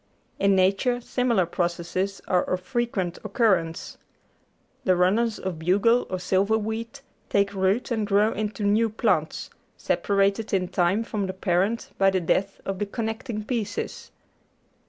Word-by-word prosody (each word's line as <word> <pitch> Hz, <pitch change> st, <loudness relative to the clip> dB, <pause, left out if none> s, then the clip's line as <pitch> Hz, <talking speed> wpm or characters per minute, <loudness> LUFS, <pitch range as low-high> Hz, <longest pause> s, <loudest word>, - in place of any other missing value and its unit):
In 200 Hz, 0 st, +4 dB
nature 195 Hz, +7 st, +2 dB
similar 240 Hz, -5 st, +1 dB
processes 175 Hz, +3 st, -2 dB
are 180 Hz, -2 st, +3 dB
of 185 Hz, 0 st, -2 dB
frequent 200 Hz, -4 st, -2 dB
occurrence. 180 Hz, -9 st, 0 dB, 0.8 s
The 185 Hz, -, +3 dB
runners 210 Hz, +6 st, +2 dB
of 180 Hz, -4 st, -5 dB
bugle 200 Hz, +8 st, +3 dB
or 185 Hz, -, -2 dB
silverweed 220 Hz, +7 st, -1 dB, 0.3 s
take 200 Hz, 0 st, +2 dB
root 195 Hz, +6 st, 0 dB
and 220 Hz, -3 st, 0 dB
grow 210 Hz, +2 st, +3 dB
into 210 Hz, 0 st, -3 dB
new 215 Hz, +3 st, +3 dB
plants, 215 Hz, -, -1 dB, 0.3 s
separated 200 Hz, +1 st, +1 dB
in 180 Hz, -2 st, 0 dB
time 185 Hz, +5 st, +1 dB
from 210 Hz, -4 st, -3 dB
the 190 Hz, -, -4 dB
parent 190 Hz, +4 st, 0 dB
by 195 Hz, 0 st, +5 dB
the 190 Hz, -1 st, +1 dB
death 195 Hz, +3 st, 0 dB
of 195 Hz, -1 st, -3 dB
the 205 Hz, -, -1 dB
connecting 220 Hz, 0 st, -4 dB
pieces. 220 Hz, -4 st, -3 dB
200 Hz, 135 wpm, -25 LUFS, 185-220 Hz, 0.8 s, by